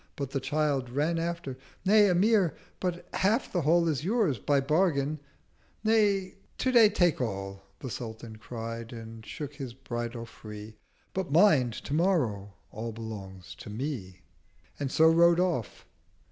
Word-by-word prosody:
But 140 -2 -4
the 135 - -1
Child 145 -3 0
Ran 150 +6 0
after—'Nay, 170 +5 +1
Amir, 185 -2 +3 0.2
but 180 -1 -3
half 215 +7 +1
the 175 - +1
Haul 170 +3 +3
Is 150 -3 0
yours 195 - +1
by 145 -1 +2
Bargain'—'Nay, 175 +7 0 0.2
Today 240 -4 +5
take 175 -8 +2
all,' 100 -4 -4 0.2
The 130 - -5
Sultan 110 -1 -7
cried, 115 +1 -6
and 115 -1 -9
shook 145 +5 -6
his 130 -5 -7
Bridle 120 -2 -5
free—180 105 -1 -10 0.4
'But 190 -6 -3
mind—Tomorrow 140 - +2 0.2
All 115 +2 -5
belongs 95 -5 -8
to - - -9
Me—' 105 -6 -5 0.6
And 140 -2 -2
so 160 - +5
rode 170 +1 +5
off. 175 - -1
140 Hz, 130 wpm, -29 LUFS, 115-175 Hz, 0.6 s, Today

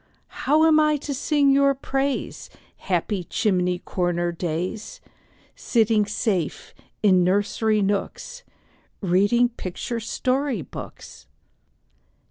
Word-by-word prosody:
How 305 +4 +2
am 315 -1 +5
I 305 -1 +3
to 285 0 -5
sing 285 +1 +2
your 275 0 +4
praise, 270 +1 -3 0.3
Happy 185 +1 -2
chimney 180 -1 0
corner 175 -1 -1
days, 175 +4 -4 0.6
Sitting 220 -3 +2
safe 205 -6 -2 0.3
in 185 -3 +5
nursery 205 +3 +1
nooks, 205 - -3 0.6
Reading 205 +6 +3
picture 230 +2 -5
story 255 +3 -1
books? - - -11
215 Hz, 100 wpm, -23 LUFS, 185-270 Hz, 0.6 s, am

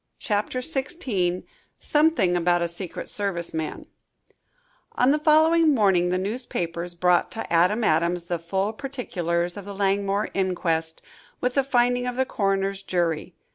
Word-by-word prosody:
CHAPTER 210 +4 -1
XVI 255 - -2 0.4
SOMETHING 295 - +2
ABOUT 175 0 +2
A - - 0
SECRET 170 +1 -5
SERVICE 190 -5 -3
MAN 160 -1 -4 1.1
On 250 +2 +3
the 300 - +2
following 315 0 +4
morning 190 -6 +3
the 180 - +1
newspapers 180 -5 -3
brought 180 0 +2
to 225 - -5
Adam 185 +7 +3
Adams 170 0 +1
the 175 0 -3
full 190 +5 -1
particulars 180 -10 -3
of 200 - -8
the 200 0 -7
Langmore 200 +1 0
inquest, 165 -4 -1 0.4
with 250 0 -1
the 275 - +2
finding 245 -1 +1
of 250 - -3
the 260 +1 +1
coroner's 195 -3 -1
jury. 175 -3 -2
195 Hz, 140 wpm, -24 LUFS, 175-245 Hz, 1.1 s, following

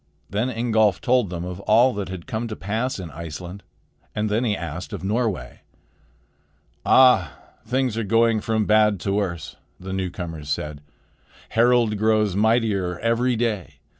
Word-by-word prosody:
Then 110 +5 0
Ingolf 110 -5 +2
told 125 -5 +2
them 85 -1 -5
of 90 0 -6
all 115 +6 +4
that 100 -2 -4
had 95 -3 -7
come 115 +2 -3
to 110 - -5
pass 110 +8 -2
in 90 -5 -7
Iceland; 85 +5 -8 0.5
and 105 0 -1
then 110 +4 +1
he 105 -5 0
asked 85 +2 -6
of - - -6
Norway. 100 - -2 1.2
"Ah! 125 - +5 0.3
things 125 -2 0
are - - -1
going 115 +1 +2
from 110 -1 0
bad 105 -2 +3
to 100 - -1
worse," 85 -7 -3 0.2
the 95 +1 -6
newcomers 85 -5 -5
said. 75 0 -3 0.7
"Harald 115 -2 +3
grows 110 -3 +2
mightier 105 -4 +1
every 115 +4 +1
day. 110 -6 -2
105 Hz, 150 wpm, -23 LUFS, 90-115 Hz, 1.2 s, Ah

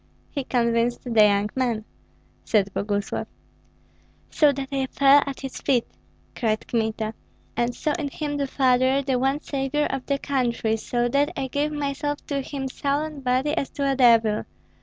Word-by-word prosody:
"He 280 - -3
convinced 235 -1 +1
the 230 -4 +4
young 205 0 +2
man," 235 -5 -1 0.6
said 200 -3 +1
Boguslav. 205 0 -2 1.0
"So 300 -2 +5
that 270 -1 -5
I 270 -1 -1
fell 280 +2 +5
at 275 - -5
his 270 -2 -6
feet," 245 -4 +2 0.5
cried 220 -2 -1
Kmita, 220 -1 -1 0.4
"and 240 0 0
saw 305 - -1
in 295 - -2
him 290 +1 -3
the 280 -1 -1
father, 260 +1 +2
the 260 -2 0
one 270 +3 +1
savior, 280 +1 -1
of 270 -1 -3
the 280 - +1
country; 240 -5 0
so 240 +2 -1
that 280 +3 +2
I 270 - -1
gave 290 +3 -1
myself 290 0 -3
to 280 -1 -2
him 270 0 -4
soul 280 +2 -1
and 305 -3 -6
body 260 +4 +1
as 280 - -1
to 280 -1 0
a - - 0
devil. 230 -4 +4
265 Hz, 170 wpm, -24 LUFS, 235-280 Hz, 1.0 s, So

